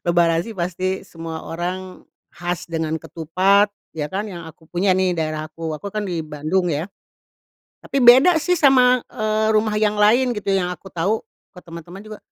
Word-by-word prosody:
Lebaran 170 -1 +2
sih 230 - -7
pasti 185 0 -2
semua 165 -1 -7
orang 180 +2 -5 0.3
khas 175 0 -4
dengan 160 -1 -2
ketupat, 185 +6 +2 0.2
ya 150 - -2
kan? 205 +2 -2
Yang 170 -3 -8
aku 160 - -31
punya 185 +2 +1
nih, 185 -1 +1
daerah 155 -1 -3
aku, 160 +1 -6
aku 155 +6 -6
kan 210 +1 -3
di 175 -4 -3
Bandung 155 +4 -1
ya, 155 -1 -1 1.0
tapi 275 -2 -1
beda 265 +9 +8
sih 320 +3 0
sama, 260 -6 +5
eee, 215 0 0
rumah 215 0 +2
yang 210 -1 +1
lain 235 +3 +3
gitu. 200 -1 -2
Yang 180 -2 0
aku 195 +4 -15
tahu, 180 +5 0 0.4
ke - - -10
teman-teman 170 +4 -10
juga, 215 -1 -9
185 Hz, 175 wpm, -21 LUFS, 165-215 Hz, 1.0 s, beda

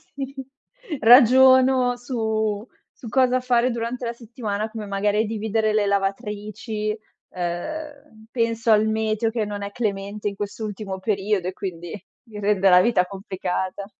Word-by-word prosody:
sì, 275 0 -6 0.6
ragiono 255 +1 +6
su 220 -4 -2 0.3
su 240 - -11
cosa 255 0 +3
fare 250 0 +2
durante 235 +2 -4
la 235 - -2
settimana, 220 -3 -4
come 220 -1 -7
magari 205 +2 0
dividere 220 0 -1
le 215 -1 +2
lavatrici, 210 +2 -2 0.3
ehm, 225 - -6
penso 230 -1 0
al 215 0 +4
meteo, 220 0 0
che 225 -1 -1
non 205 0 -5
è 200 - -5
clemente 205 -2 -3
in 200 - -9
quest'ultimo 205 -1 -5
periodo 195 -2 -1
e - - -7
quindi 175 -4 -6 0.4
mi 210 -1 -8
rende 200 -2 +3
la 180 - +7
vita 205 -4 +2
complicata. 190 0 -4
215 Hz, 135 wpm, -23 LUFS, 200-235 Hz, 0.6 s, la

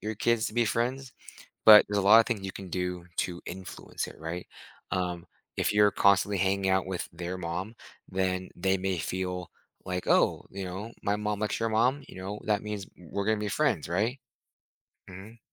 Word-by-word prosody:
your 110 +1 -3
kids 115 +1 +1
to 110 - -6
be 120 0 +3
friends, 125 +4 -1 0.5
but 105 -1 +10
there's 105 - -1
a - - +1
lot 105 +4 +8
of 115 - +4
things 115 -5 -2
you 95 - -4
can 95 -2 -8
do 90 -1 -3
to 90 -1 -2
influence 95 0 -6
it, - - -11
right, 80 +3 -5 0.4
um, 90 -2 -2 0.3
if - - +1
you're 105 0 +5
constantly 100 0 +3
hanging 95 +1 +1
out 95 -1 +2
with 95 -2 -3
their 90 +2 -5
mom, 90 +6 -4 0.3
then 95 0 -1
they 95 +2 +1
may 95 -1 -1
feel 90 +2 -3 0.4
like, 90 -1 -3
"Oh," - - +3
you 95 0 -6
know, 95 +5 -6
"My 100 +1 +1
mom 105 -1 -2
likes 105 +1 -1
your 115 - 0
mom, 125 +6 +2
you - - -12
know, 100 +3 -5
that 105 -1 +1
means 105 -2 -4
w 85 -4 -17
we're 100 0 -2
gonna 110 0 +2
be 105 -1 -2
friends, 80 - +1
right?" 110 +9 0 0.9
Mhm. 100 +5 -11
95 Hz, 195 wpm, -28 LUFS, 90-105 Hz, 0.9 s, but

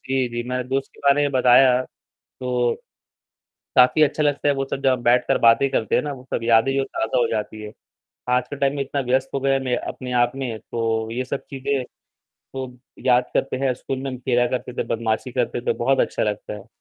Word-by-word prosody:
जी, 130 -2 0
जी 120 0 -4
मैंने 125 0 -2
दोस्त 135 +1 -2
के - - -18
बारे 145 +1 +4
में 145 - +1
बताया, 125 0 +5 0.6
तो 125 -1 0 1.0
काफ़ी 130 +5 +6
अच्छा 150 +1 +2
लगता 145 0 +1
है 145 - +3
वो 135 0 -1
सब 135 - -3
जब 135 - +4
हम 125 - -2
बैठकर 120 +1 +3
बातें 115 +4 +5
करते 110 - 0
हैं - - +2
ना, 145 -1 -4
वो 130 -1 -11
सब - - 0
यादें 115 +3 +4
जो 135 - +1
ताज़ा 130 -1 -2
हो - - +3
जाती 110 0 -4
हैं, 105 - -8 0.6
आज 125 0 +1
के 145 - -6
टाइम 140 0 0
में 140 - -2
इतना 140 +1 -3
व्यस्त 130 +1 +1
हो 140 - 0
गए 135 0 +1
हैं, 135 - +2
मैं 125 -1 +1
अपने 125 -1 -6
आप 120 - 0
में, 125 -5 -4
तो 115 -1 -2
ये 125 +2 -3
सब 135 +1 -5
चीज़ें 135 -1 -2 0.7
तो 130 -1 -5 0.3
याद 125 -1 +4
करते 135 - 0
हैं 130 - +2
स्कूल 135 +2 -5
में 135 0 -4
हम 130 - -6
फिरा 120 -1 +3
करते 125 0 -6
थे, - - -2
बदमाशी 115 +2 -2
करते 120 -1 -1
थे, - - -19
तो - - +2
बहुत 135 0 +3
अच्छा - - 0
लगता 105 0 -3
है। 105 +1 -10
125 Hz, 230 wpm, -22 LUFS, 120-135 Hz, 1.0 s, काफ़ी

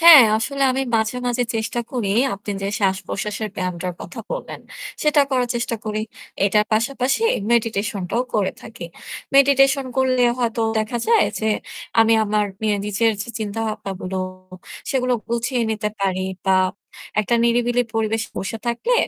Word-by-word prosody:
হ্যাঁ 330 -5 +11
আসলে 275 +5 -2
আমি 265 +1 0
মাঝে, 220 +2 0
মাঝে 245 0 +1
চেষ্টা 225 +2 -1
করি। 240 -6 -1 0.3
আপনি 205 +1 -7
যে 195 - -1
শ্বাসপ্রশ্বাসের 195 +2 -1
ব্যায়ামটার 180 -1 -3
কথা - - -9
বললেন - - -5 0.4
সেটা 300 -1 +4
করার 250 -2 +1
চেষ্টা 235 -1 -1
করি। 215 0 -2 0.4
এটার 210 +1 +3
পাশাপাশি 255 - +1 0.3
meditation 215 -4 0
টাও 240 - +1
করে 205 -3 +1
থাকি। 220 -7 -8 0.5
Meditation 275 0 +5
করলে 260 -1 +3 0.2
হয়তো 230 -2 0 0.2
দেখা 220 +2 -1
যায় 455 -2 +5
যে 220 - 0 0.5
আমি 225 0 +5
আমার 210 0 +1 0.2
মে 220 - +1 0.2
নিজের 220 +2 +2
যে - - -10
চিন্তাভাবনাগুলো 205 -3 -3 0.7
সেগুলো 255 -1 +1 0.2
গুছিয়ে 235 +1 0
নিতে 215 -1 -1
পারি। 190 -1 0 0.2
বা 190 0 +5 0.6
একটা 215 +3 0
নিরিবিলি 240 +1 +2
পরিবেশে 225 0 0
বসে 225 +4 -4
থাকলে 240 - +1
225 Hz, 140 wpm, -21 LUFS, 210-250 Hz, 0.7 s, হ্যাঁ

